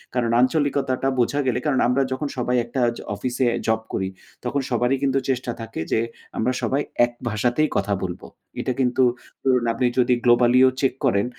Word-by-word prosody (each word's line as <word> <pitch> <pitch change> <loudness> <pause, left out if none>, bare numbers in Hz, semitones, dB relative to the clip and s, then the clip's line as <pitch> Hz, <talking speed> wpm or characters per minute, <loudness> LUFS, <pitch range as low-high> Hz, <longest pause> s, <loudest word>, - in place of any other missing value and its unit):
কারণ 120 -2 +1
আঞ্চলিকতাটা 135 -1 +1
বোঝা 135 +4 +1
গেলে 125 - +1
কারণ 145 -4 +2
আমরা 125 +3 +2
যখন 130 +3 -2
সবাই 125 0 0
একটা 125 +2 -3 0.2
জ - - -9 0.2
অফিসে 125 +4 -1 0.2
জব 110 0 +2
করি 95 - -1 0.4
তখন 135 +3 -1
সবারই 125 +2 +1
কিন্তু 135 0 +2
চেষ্টা 125 -2 -1
থাকে 115 - -7
যে, - - +3 0.4
আমরা 125 +3 +1
সবাই 140 +2 0 0.2
এক 120 - -8 0.2
ভাষাতেই 120 +8 +1
কথা 100 +1 0
বলবো। 90 -2 -5 0.3
এটা - - -1
কিন্তু 130 0 +2 0.4
ধরুন 125 -3 +2
আপনি 125 +2 0
যদি 125 0 +4
globally 120 +1 +5
ও - - +5
চেক 135 - +2
করেন 100 -5 +2
125 Hz, 180 wpm, -23 LUFS, 120-135 Hz, 0.4 s, globally